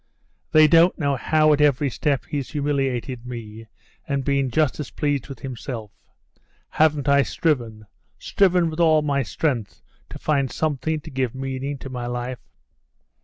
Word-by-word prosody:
They 155 0 +7
don't 170 +3 +5
know 140 -4 0
how 155 +3 +3
at 150 - +1
every 145 -1 +3
step 140 +1 -1
he's 140 -3 -4
humiliated 135 -4 -2
me, 115 -2 -8 0.4
and 140 -2 -1
been 140 -2 +1
just 155 +3 +1
as 145 -6 -4
pleased 145 0 -2
with 135 - -9
himself. 120 -4 -6 0.8
Haven't 150 -2 +2
I 140 0 +5
striven, 120 -9 -1 0.3
striven 180 -4 +2
with 155 - -7
all 160 -2 +4
my 140 -2 +1
strength, 130 -7 -2 0.3
to - - -8
find 140 -3 0
something 155 0 -1
to 160 - -11
give 130 -2 -2
meaning 135 +1 -4
to 135 - -9
my 125 -1 -4
life? 120 0 -4
140 Hz, 155 wpm, -23 LUFS, 125-150 Hz, 0.8 s, They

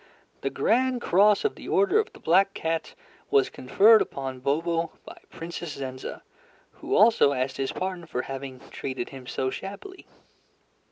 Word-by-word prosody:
The - - -1
Grand 255 +1 +1
Cross 205 - +4
of 430 - +1
the - - -11
Order 400 +1 +3
of 440 +1 -1
the - - -15
Black 195 +1 +3
Cat 165 0 -3 0.3
was 420 -2 +3
conferred 210 - +5
upon 135 -1 -4
Bobo 165 +5 -1
by - - -11
Princess 170 -1 -6
Zenza, 130 -1 -6 0.5
who - - -3
also 215 -9 +5
asked 130 0 -2
his 135 -1 -1
pardon 185 -3 -4
for 125 -5 -3
having 135 -2 -7
treated 130 -3 -4
him 130 -2 -11
so 130 0 -2
shabbily. 200 - -8
165 Hz, 155 wpm, -26 LUFS, 135-215 Hz, 0.5 s, conferred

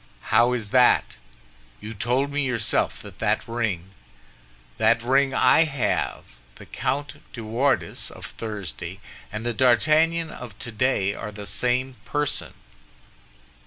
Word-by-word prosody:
"How 120 +3 +5
is 110 -4 -3
that? 125 -1 +4 0.6
You 110 +2 -7
told 125 +6 0
me 145 +1 0
yourself 115 -5 0
that - - -12
that - - 0
ring—" 105 -6 -2 0.9
"That 115 +1 +3
ring 135 +2 +3
I 130 +6 +5
have! 140 -4 -1 0.3
The - - -12
Comte 145 +1 -3 0.2
de 115 - -7
Wardes 125 +6 0
of - - -11
Thursday 105 -7 -6 0.3
and 110 +2 -5
the 120 - 0
D'Artagnan 155 +7 +3
of 120 -5 -9
today 110 -3 0
are 105 - -6
the 105 0 -8
same 125 +3 -1
person." 145 0 -2
120 Hz, 125 wpm, -24 LUFS, 110-135 Hz, 0.9 s, How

